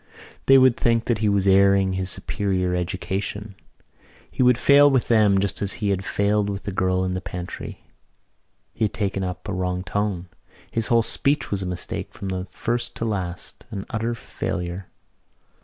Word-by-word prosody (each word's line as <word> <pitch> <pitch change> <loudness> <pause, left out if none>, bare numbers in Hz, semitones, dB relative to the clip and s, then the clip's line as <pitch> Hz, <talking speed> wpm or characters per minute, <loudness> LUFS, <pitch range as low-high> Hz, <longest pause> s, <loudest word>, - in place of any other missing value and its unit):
They 135 - +8
would 130 -2 +6
think 115 -2 +1
that 120 -3 0
he 110 -1 +2
was 100 -1 +2
airing 100 0 +4
his 95 0 -2
superior 90 -1 -1
education. 95 +3 -3 0.8
He - - -2
would 125 -1 +5
fail 145 +2 +6
with 130 -3 +1
them 105 -4 +4
just 95 -1 -1
as 100 -1 +4
he 110 -5 -2
had 95 -1 -1
failed 100 +1 +1
with 100 -1 -4
the 100 - -4
girl 95 0 +1
in 90 - -1
the 90 0 -3
pantry. 90 -1 -7 0.9
He 110 - 0
had 105 - -3
taken 100 -4 -1
up 90 +2 -5
a 100 - -3
wrong 90 -1 -2
tone. 100 -3 -2 0.4
His 115 -2 -1
whole 115 -1 +4
speech 140 +6 0
was 100 -2 -1
a 95 - -3
mistake 90 -1 -4
from 95 -1 -4
first 120 +5 -2
to 115 - -3
last, 95 -5 -5
an 95 -1 -5
utter 115 +1 -1
failure. 90 -4 -5
100 Hz, 175 wpm, -23 LUFS, 95-115 Hz, 0.9 s, They